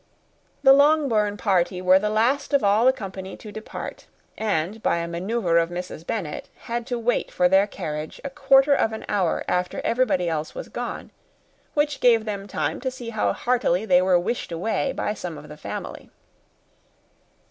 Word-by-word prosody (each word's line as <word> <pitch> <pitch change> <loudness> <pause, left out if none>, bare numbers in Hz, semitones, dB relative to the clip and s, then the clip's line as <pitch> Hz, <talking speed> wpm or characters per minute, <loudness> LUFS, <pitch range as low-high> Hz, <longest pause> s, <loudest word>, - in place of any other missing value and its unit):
The 270 - +8
Longbourn 275 -8 +3
party 185 -3 +1
were 185 +1 +5
the 210 +2 -1
last 255 +7 +1
of 280 - +2
all 205 +3 +4
the - - +8
company 190 -5 -7
to 215 - -10
depart; 215 +1 -8 0.3
and 205 0 -2
by - - +1
a 170 0 -2
manœuvre 175 0 +1
of 165 - -2
Mrs. 175 -2 -7
Bennet 180 -10 -4
had 235 0 -4
to 245 -2 -2
wait 235 +1 0
for 180 - +2
their 190 +2 +4
carriage 155 -6 -6
a 280 - -5
quarter 270 0 +4
of 225 -5 +1
an 220 - -6
hour 190 -5 0
after 180 0 -1
everybody 230 -8 +1
else 160 -2 -3
was - - -7
gone, - - -6 0.6
which 295 -1 +1
gave 230 -3 +4
them 200 -2 -4
time - - -2
to 260 - -1
see 245 -2 -8
how 220 - +1
heartily 235 -6 0
they 180 -3 +5
were 185 -1 +4
wished 180 +2 -3
away 220 +10 -1
by 210 - -2
some 175 -6 -6
of 145 0 -12
the 150 - -9
family. - - -7
210 Hz, 180 wpm, -24 LUFS, 180-240 Hz, 0.6 s, The